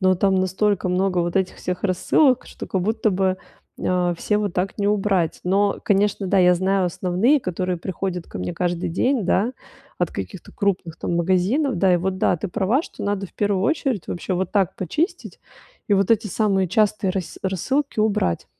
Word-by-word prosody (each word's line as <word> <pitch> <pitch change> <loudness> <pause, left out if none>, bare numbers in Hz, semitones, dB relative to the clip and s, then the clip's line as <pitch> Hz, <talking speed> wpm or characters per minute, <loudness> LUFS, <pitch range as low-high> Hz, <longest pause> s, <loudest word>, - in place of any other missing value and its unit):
но 185 -1 +4
там 190 +1 +2
настолько 190 +1 +1
много 185 0 +1
вот 175 +1 0
этих 190 -1 0
всех 180 -1 -4
рассылок, 250 - +2
что - - -8
как 190 - -1
будто 220 +2 +1
бы, 190 0 +1 0.5
а, 180 -1 +1
все 210 +5 0
вот 205 -4 -1
так 185 +3 -2
не 200 - 0
убрать. 195 -5 +1
Но, 200 +2 +2
конечно, 200 0 +1
да, 195 +1 +2
я 180 -1 +6
знаю 190 +1 +1
основные, 185 - +2
которые 180 -1 -2
приходят 180 0 -4
ко - - -8
мне 90 0 -4
каждый 175 0 -1
день, 230 +6 +1
да, 215 +7 +1 0.5
от - - 0
каких-то - - -7
крупных, 185 -5 -1
там, 170 - -2
магазинов, 190 - +1
да. 185 +1 +3
И - - +4
вот 185 +2 -2
да, 180 - +2
ты 190 - -4
права, 210 - +1
что - - -10
надо 200 -1 -1
в - - -23
первую 200 -2 0
очередь 270 - 0
вообще 180 - -4
вот 185 0 -2
так 195 -3 +1
почистить 305 - -3 0.5
и 205 - +4
вот 195 +2 +1
эти 220 -1 +3
самые 195 -2 +1
частые 205 -1 +1
рассы 185 -2 -4
рассылки 240 - -1
убрать. 210 - 0
190 Hz, 190 wpm, -22 LUFS, 180-210 Hz, 0.5 s, я